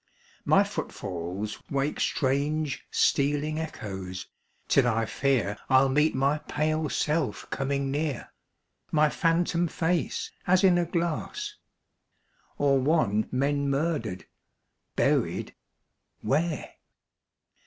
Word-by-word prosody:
My - - +5
footfalls 95 +3 -5
wake 140 +1 -1
Strange 145 +1 0
stealing 145 +2 +1
echoes, 95 - -5 0.4
till 135 -3 +4
I 115 -1 +1
fear 120 -5 0
I'll 135 0 +5
meet 150 +3 +3
my 140 +3 +2
pale 155 +1 -1
self 150 0 -1
coming 135 0 -1
near; 145 -2 -2 0.6
My 155 -1 +4
phantom 170 +1 +1
face 165 +1 -1 0.2
as 185 +2 +4
in 180 -2 +5
a 175 - +1
glass; 175 - -2 1.0
Or 140 -1 +3
one 130 -7 +2
men 140 +2 +1
murdered, 140 - -1 0.7
buried - - +1 0.7
where? 155 +2 -1
145 Hz, 100 wpm, -27 LUFS, 130-160 Hz, 1.0 s, My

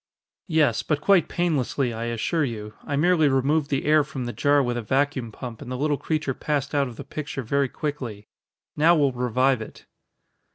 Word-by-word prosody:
"Yes. 155 - +2
But 150 -2 -1
quite 180 +2 +3
painlessly, 140 -7 0
I 115 +1 -4
assure 120 +8 0
you. 105 -5 -4
I 145 - -3
merely 160 +1 +3
removed 140 +3 +1
the 140 -2 -1
air 150 0 +5
from 140 -4 -6
the 120 - -4
jar 145 0 +3
with 120 -1 -1
a 120 - -2
vacuum 130 0 0
pump 120 0 -8
and 125 - -8
the 125 - -3
little 145 +2 +1
creature 155 -4 -1
passed 145 +1 -2
out 140 -1 +2
of 120 - -9
the 140 - -8
picture 145 -1 -5
very 140 +3 +1
quickly. 125 -10 -5 0.5
Now 165 +3 +5
we'll 145 -4 +3
revive 125 0 +1
it." 110 - -10
140 Hz, 195 wpm, -24 LUFS, 125-150 Hz, 0.5 s, air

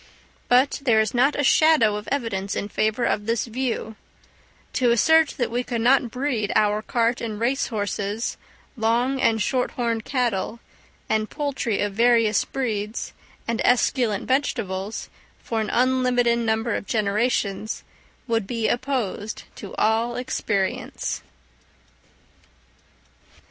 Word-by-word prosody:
But 255 +3 +3
there 240 -6 +3
is 220 -1 +1
not 265 +4 +3
a 285 - 0
shadow 280 -7 +5
of 210 0 -6
evidence 200 -8 -2
in 205 - -3
favour 215 +3 0
of 210 -2 0
this 230 0 0
view: 235 -2 -3 0.8
to 250 -2 +2
assert 320 +7 +4
that 240 -3 -1
we 245 +1 -1
could 240 -2 -3
not 250 +1 +4
breed 250 -4 -1
our 210 0 +3
cart 235 0 0
and 215 -3 -4
race 250 +4 0
horses, 205 0 -2 0.4
long 240 +4 +1
and 225 -1 +3
short 250 +4 0
horned 230 -2 -1
cattle, 235 -4 -1 0.5
and 215 0 0
poultry 275 -7 -2
of 205 -1 -1
various 230 -1 +3
breeds, 220 -4 -3 0.3
and 230 -1 -1
esculent 240 -4 +2
vegetables, 220 -7 -1 0.4
for 225 -1 -1
an 215 - -3
unlimited 250 -1 +2
number 225 0 0
of - - -4
generations, 215 -1 0 0.4
would 225 -4 0
be 230 -1 -1
opposed 240 -5 -2
to 200 - -8
all 225 +2 +1
experience. 210 -6 -2
230 Hz, 130 wpm, -24 LUFS, 215-250 Hz, 0.8 s, shadow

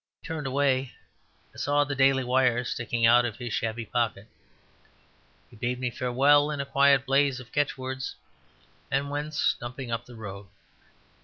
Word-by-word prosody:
As - - -66
he - - -9
turned 155 -4 -3
away, 135 -1 +1 0.6
I - - -17
saw 145 0 +2
the 145 0 -3
Daily 135 -1 +3
Wire 125 -1 +2
sticking 120 -1 -1
out 120 +2 +6
of 120 -3 -4
his 120 -3 -5
shabby 115 0 -2
pocket. 110 -3 -2 1.2
He - - -15
bade 125 +3 -2
me 125 -1 -2
farewell 140 +5 +3
in 150 -2 -3
quite 140 +1 +4
a 140 - +7
blaze 135 0 +1
of 120 -2 -13
catchwords, 130 -2 -2 0.7
and 140 +1 -1
went 145 +1 -4
stumping 120 -2 -2
up 115 +1 -3
the 120 - -12
road. 100 -3 -8
130 Hz, 165 wpm, -27 LUFS, 120-140 Hz, 1.2 s, a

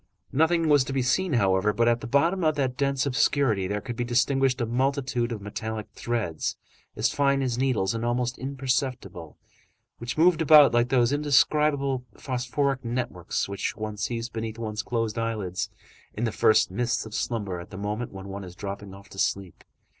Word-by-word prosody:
Nothing 160 +3 +2
was 145 -3 +5
to 135 - -4
be 135 -2 +1
seen, 180 +6 +1
however, 100 -3 +3
but 115 +2 +2
at 120 0 +2
the - - -5
bottom 165 +8 +2
of 155 -1 +2
that 130 -3 -1
dense 140 0 0
obscurity 125 -7 +2
there 105 +1 -2
could 120 - -6
be 120 - -2
distinguished 125 +2 +2
a 120 - 0
multitude 125 0 0
of 105 -3 -5
metallic 110 +1 -5
threads, 110 -10 -2 0.4
as - - 0
fine 140 -1 +2
as 125 -2 -1
needles 120 -8 +1
and 115 0 -3
almost 120 +1 -1
imperceptible, 130 - -3 0.6
which 120 +4 -5
moved 165 0 +4
about 150 -3 +7
like 120 +1 +3
those 125 0 +3
indescribable 145 -2 +2
phosphoric 130 +1 -1
networks 120 -7 -2
which 100 0 -3
one 110 0 -4
sees 115 +3 -3
beneath 110 -1 -5
one's 110 -2 -3
closed 115 0 -2
eyelids, 105 -6 -2 0.5
in 110 - -3
the 115 - +1
first 110 0 +3
mists 120 +5 -1
of 110 - -10
slumber 100 -8 -2
at 85 - -10
the 95 - -9
moment 105 +4 -3
when 95 0 -9
one 100 +1 -6
is 90 -1 -10
dropping 100 0 -7
off 100 0 -14
to 95 - -10
sleep. 95 -3 -2
120 Hz, 185 wpm, -26 LUFS, 105-135 Hz, 0.6 s, about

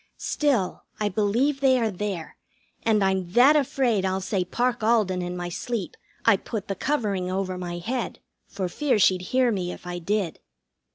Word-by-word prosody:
Still, 265 -11 0 0.2
I 210 -1 +1
believe 225 +8 +1
they 265 -2 +5
are 225 -3 +1
there, 190 -4 -4 0.5
and 215 -3 +2
I'm 190 -2 0
that 265 +5 +7
afraid 255 -7 +2
I'll 190 0 0
say 190 0 -1
Parke 240 +6 -1
Alden 215 -5 +2
in 180 0 -4
my 175 0 -4
sleep 220 +2 -4 0.3
I 230 -4 +6
put 210 0 -5
the 195 - -1
covering 200 -6 -1
over 185 -1 -2
my 175 -1 -5
head, 235 +8 -3 0.3
for 190 -2 -3
fear 265 +8 +1
she'd 185 -2 +4
hear 255 -1 +3
me 180 -4 -2
if - - -10
I 175 0 -4
did. 195 0 -1
200 Hz, 175 wpm, -25 LUFS, 185-240 Hz, 0.5 s, that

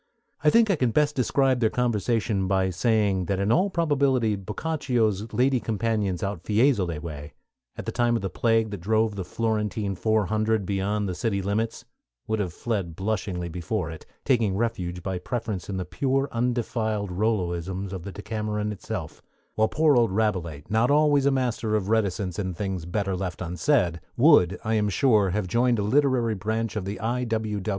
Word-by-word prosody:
I 150 - +6
think 225 +3 +4
I - - +3
can 125 -4 +2
best 150 +5 +2
describe 130 0 +2
their 110 -2 +3
conversation 110 -4 0
by 95 -1 +1
saying 100 -1 +1
that 95 0 -1
in 100 +2 +1
all 185 +9 +3
probability 140 - +1
Boccaccio's 110 - -1
lady 125 +3 +2
companions 110 -5 -1
out 100 -3 -3
Fiesole 105 - +2
way, 75 -2 -8 0.4
at - - -6
the - - -2
time 120 -1 +1
of 115 - -2
the - - 0
plague 115 -2 +1
that 100 -4 -6
drove 110 +3 +1
the 95 - -3
Florentine 105 -1 -1
Four 110 +2 +1
Hundred 110 0 0
beyond 100 +2 -1
the 90 - -2
city 100 +3 -1
limits, 105 +4 -2 0.4
would 110 0 -1
have 95 -4 -1
fled 95 -3 -3
blushingly 95 -2 -2
before 85 +1 -3
it, 80 - -11 0.2
taking 115 -8 +2
refuge 90 -6 -2
by 95 -2 -3
preference 110 -2 -4
in 95 - -3
the 90 - -3
pure, 135 +8 0
undefiled 115 -4 -1
Rolloisms 95 -1 -1
of 95 - -5
the 100 +3 -7
Decameron 105 0 -3
itself; 100 -6 -6 0.3
while 110 0 +2
poor 155 +3 +3
old 120 -2 +4
Rabelais, 90 -8 -1
not 110 +3 +2
always 145 -1 +4
a - - +4
master 120 -4 0
of 105 -2 -1
reticence 100 -4 0
in 95 -3 -3
things 95 -2 -4
better 95 +1 -1
left 90 -1 -4
unsaid, 90 - +1 0.2
would, 120 - +5
I 110 - -1
am 105 -1 +2
sure, 105 -1 +3
have 105 +2 -1
joined 120 +5 +2
a 105 - 0
literary 125 0 +2
branch 110 +3 -2
of 105 -3 -3
the 100 +2 -4
I. 120 +3 -1
W. 110 -3 -2
105 Hz, 180 wpm, -25 LUFS, 95-115 Hz, 0.4 s, I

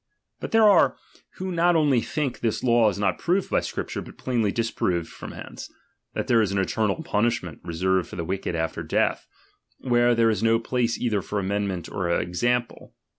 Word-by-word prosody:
But - - -5
there 225 0 +4
^re, 205 -4 +5 0.4
who 185 0 -4
not 175 0 +3
only 145 -6 +3
think 140 -1 -3
this 115 -2 -1
law 120 -3 +4
is 100 - -4
not 100 0 0
proved 180 +3 0
by - - +3
Scripture, - - -4
but - - -12
plainly 115 -5 0
disproved 90 -7 -1
from - - -9
hence; - - -9 0.4
that - - -1
there 115 -2 +4
is 105 -3 0
an 100 - -1
eternal 105 - 0
punishment 105 - -1
reserved 90 +2 0
for - - -8
the 85 -2 -4
■^cked 95 0 -3
after 80 0 -2
death, - - 0 0.5
where 120 -1 +2
there 115 -1 +4
is 105 -2 -2
no 115 0 +4
place 115 0 -1
either 110 -5 0
'for 105 - -4
amendment 100 -2 -2
or 90 -3 -3
example. 120 +8 -1
115 Hz, 185 wpm, -25 LUFS, 95-125 Hz, 0.5 s, ^re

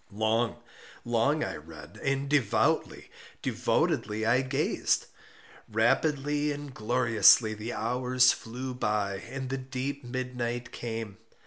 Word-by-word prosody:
Long, 110 +3 +1 0.5
long 120 +6 +2
I - - -3
read—and 105 - -4
devoutly, 140 -7 +1 0.3
devotedly 110 +1 0
I 120 +3 +4
gazed. 130 -1 0 0.7
Rapidly 145 +6 +1
and 145 -1 -6
gloriously 115 -1 +4
the 110 +2 -5
hours 125 +2 +3
flew 125 +3 -5
by 105 -5 -1
and 130 +5 -6
the 135 - -2
deep 130 +2 -4
midnight 125 -1 -4
came. 115 -4 -5
120 Hz, 105 wpm, -29 LUFS, 110-130 Hz, 0.7 s, I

